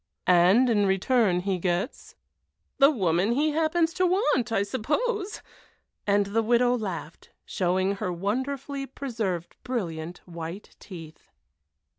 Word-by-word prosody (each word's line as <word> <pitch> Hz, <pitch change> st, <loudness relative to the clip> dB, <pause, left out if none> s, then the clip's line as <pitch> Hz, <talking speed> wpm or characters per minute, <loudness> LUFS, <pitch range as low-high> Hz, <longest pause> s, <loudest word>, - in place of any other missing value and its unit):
"And 185 Hz, +8 st, +5 dB
in 205 Hz, -4 st, +2 dB
return 190 Hz, -1 st, +2 dB
he 190 Hz, -1 st, -1 dB
gets?" 180 Hz, +7 st, -3 dB, 0.6 s
"The 275 Hz, 0 st, +8 dB
woman 190 Hz, -, +1 dB
he 300 Hz, +4 st, +2 dB
happens 325 Hz, +2 st, +1 dB
to 370 Hz, +1 st, +2 dB
want, 300 Hz, -, +1 dB
I 200 Hz, -3 st, +2 dB
suppose." 380 Hz, -, -2 dB, 0.6 s
And 200 Hz, 0 st, +3 dB
the 210 Hz, +3 st, 0 dB
widow 245 Hz, +2 st, +3 dB
laughed, 185 Hz, -8 st, -6 dB, 0.2 s
showing 185 Hz, +2 st, 0 dB
her 185 Hz, -, -2 dB
wonderfully 265 Hz, +9 st, -3 dB
preserved 225 Hz, -11 st, -4 dB
brilliant 175 Hz, -9 st, -4 dB
white 170 Hz, +3 st, -8 dB
teeth. 165 Hz, -5 st, -11 dB
210 Hz, 120 wpm, -26 LUFS, 180-270 Hz, 0.6 s, The